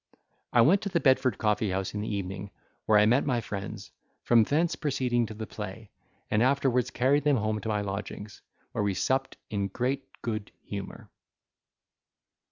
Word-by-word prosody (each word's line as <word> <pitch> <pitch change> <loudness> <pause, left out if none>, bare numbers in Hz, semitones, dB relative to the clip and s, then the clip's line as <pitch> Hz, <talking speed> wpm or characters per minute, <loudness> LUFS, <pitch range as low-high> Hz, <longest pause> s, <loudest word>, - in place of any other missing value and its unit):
I 120 - +5
went 175 +12 +5
to 200 - -3
the 175 -3 +1
Bedford 130 -3 +3
Coffee 105 -1 +1
house 95 0 -2
in 105 - -3
the 110 - -3
evening, 95 0 -4 0.4
where 110 - +6
I 105 - +6
met 125 +5 +4
my 125 -4 +1
friends, 100 -3 -6 0.3
from 115 -2 +5
thence 160 +8 +1
proceeded 125 -5 0
to 110 - -8
the 110 +1 -5
play, 105 0 -8 0.4
and 105 - +3
afterwards 130 -1 +2
carried 135 +3 +2
them 145 -2 +3
home 110 0 -1
to 110 - -4
my 105 -1 0
lodgings, 100 +1 -6 0.3
where - - -1
we 100 -2 0
supped 130 +8 0
in 100 -2 0
great 130 +7 -2 0.2
good 110 -3 -3
humour. 100 -1 -7
110 Hz, 175 wpm, -28 LUFS, 105-130 Hz, 0.4 s, where